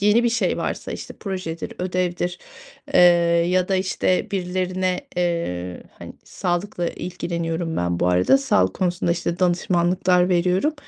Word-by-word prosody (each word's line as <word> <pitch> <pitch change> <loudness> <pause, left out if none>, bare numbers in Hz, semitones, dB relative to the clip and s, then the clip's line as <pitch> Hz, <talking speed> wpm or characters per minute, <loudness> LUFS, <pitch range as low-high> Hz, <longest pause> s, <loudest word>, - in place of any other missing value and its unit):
yeni 210 +4 +4
bir - - +4
şey 230 0 0
varsa, - - -4
işte, - - -8
projedir, 185 -5 -5
ödevdir, 180 -1 -2 0.6
eee, - - +7 0.5
ya 185 0 +2
da, 190 - +2
işte, 185 +2 0
birilerine, 185 -1 -1 0.2
eee, 170 - -2 0.2
hani, - - -9
sağlıkla 175 0 -2
ilgileniyorum 170 -2 -3
ben 85 0 -1
bu - - +2
arada, 90 +10 +4
sağlık 95 -9 +2
konusunda, 175 -2 0
işte, 170 0 -3
danışmanlıklar 180 0 +2
veriyorum. 185 - +2
180 Hz, 130 wpm, -22 LUFS, 170-185 Hz, 0.6 s, eee